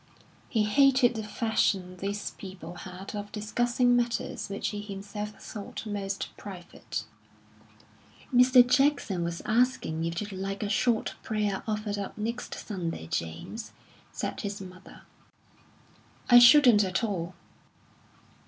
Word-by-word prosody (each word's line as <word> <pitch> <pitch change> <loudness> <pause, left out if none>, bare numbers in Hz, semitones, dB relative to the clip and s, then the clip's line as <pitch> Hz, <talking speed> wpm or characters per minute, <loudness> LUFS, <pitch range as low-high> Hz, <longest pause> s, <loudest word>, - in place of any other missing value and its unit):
He 220 -3 +2
hated 255 +2 +4
the 220 - -4
fashion 205 -4 0
these 200 +2 -3
people 185 -3 -9
had 185 +3 -9
of 205 0 -5
discussing 240 +3 +1
matters 240 -3 -1
which 200 - -2
he 205 -1 -5
himself 205 +1 -6
thought 210 +1 -7
most 200 -2 -4
private. 180 -4 -7 1.3
"Mr. 250 0 +7
Jackson 260 -9 +2
was 170 0 -4
asking 220 -9 +1
if 170 0 -2
you'd 210 0 -5
like 195 +2 -4
a 205 - -2
short 225 +1 +1
prayer 210 -3 -1
offered 210 -1 -2
up 200 - -6
next 230 +3 -4
Sunday, 170 - -5
James," 85 - -4 0.4
said - - -4
his 205 -1 -4
mother. 185 -1 -12 1.3
"I 245 - +11
shouldn't 245 -4 +8
at 190 +3 -1
all." 185 -5 -2
205 Hz, 125 wpm, -28 LUFS, 190-235 Hz, 1.3 s, I